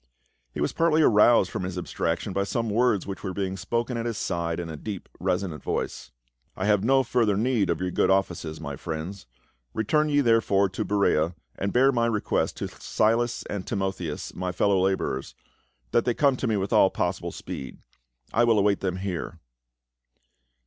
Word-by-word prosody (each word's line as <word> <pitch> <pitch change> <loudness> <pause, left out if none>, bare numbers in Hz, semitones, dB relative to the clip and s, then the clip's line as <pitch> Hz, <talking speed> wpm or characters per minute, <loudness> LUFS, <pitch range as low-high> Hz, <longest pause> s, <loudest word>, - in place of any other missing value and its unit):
He - - -7
was - - 0
partly 160 -1 +3
aroused 105 -3 +5
from - - -3
his 90 0 -4
abstraction 90 +2 -2
by 100 - +1
some 115 +2 -2
words 110 -3 +2
which 95 -1 -6
were 95 -3 -4
being 95 -1 -2
spoken 115 +6 -2
at 115 0 -2
his 115 -3 -3
side 85 -1 -2
in 85 - -4
a 80 - -6
deep 100 +4 -6
resonant 90 -4 -1
voice. - - -3 0.2
" - - -42
I 95 - -2
have 105 -2 +3
no 135 +3 +4
further 115 -5 +1
need 115 -3 +1
of 85 - 0
your 90 0 -2
good - - +2
offices, 90 -5 0
my 70 -3 -5
friends; 80 +3 -6 0.5
return 150 +8 +2
ye 145 -1 +3
therefore 115 -5 +3
to 95 - -3
Berea 90 -5 +1 0.2
and 100 +1 -2
bear 135 +2 +5
my 120 -2 +1
request 110 -3 0
to - - -3
Silas 120 +2 0
and 100 -2 -5
Timotheus, 95 -7 -3
my 90 0 -3
fellow 95 0 +2
laborers, 95 -8 -1 0.6
that 120 - +2
they 120 - +1
come 140 -3 +3
to 130 - -2
me 110 -2 +1
with 95 0 -2
all - - +6
possible - - -2
speed; 65 - -7 0.6
I 120 - +4
will 115 -2 +4
await 100 -1 +3
them 95 -2 -2
here." 95 -2 -4
100 Hz, 185 wpm, -26 LUFS, 90-115 Hz, 0.6 s, all